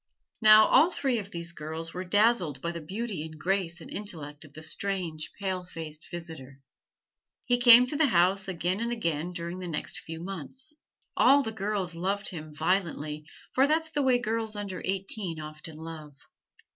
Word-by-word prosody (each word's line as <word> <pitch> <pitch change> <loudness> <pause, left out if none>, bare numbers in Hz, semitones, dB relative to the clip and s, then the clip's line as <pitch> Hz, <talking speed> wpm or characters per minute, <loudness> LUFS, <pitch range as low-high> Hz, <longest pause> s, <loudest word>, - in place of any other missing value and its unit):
Now, 215 0 +9
all 310 +6 +6
three 265 -8 0
of 200 -1 -7
these 170 -3 -4
girls 160 +1 -6
were 180 - -4
dazzled 195 - +2
by 170 +4 -3
the 170 -1 -6
beauty 195 +1 -4
and 155 0 -9
grace 180 +1 -1
and - - -11
intellect 155 -8 -5
of 150 -2 -15
the 155 - -8
strange, 170 -2 -2
pale 190 -2 -2
faced 160 -3 -8
visitor. 160 -6 -7 0.9
He 245 0 +2
came 245 0 +9
to 255 - -5
the 305 0 +4
house 190 -1 +3
again 180 +1 -1
and 235 +1 -1
again 170 -7 -1
during 170 +1 -5
the 180 - -5
next 155 -3 -3
few 165 0 -8
months. 195 - -7 0.4
All 280 +1 +6
the 225 - -3
girls 200 -4 -2
loved 195 +4 -1
him 155 -3 -8
violently, 155 -2 -1 0.3
for 270 +2 +4
that's 320 +1 +1
the 290 - 0
way 260 -2 +4
girls 225 -2 -2
under 200 -3 -5
eighteen 190 -3 -2
often 155 +1 -8
love. 155 -3 -9
180 Hz, 175 wpm, -28 LUFS, 160-215 Hz, 0.9 s, Now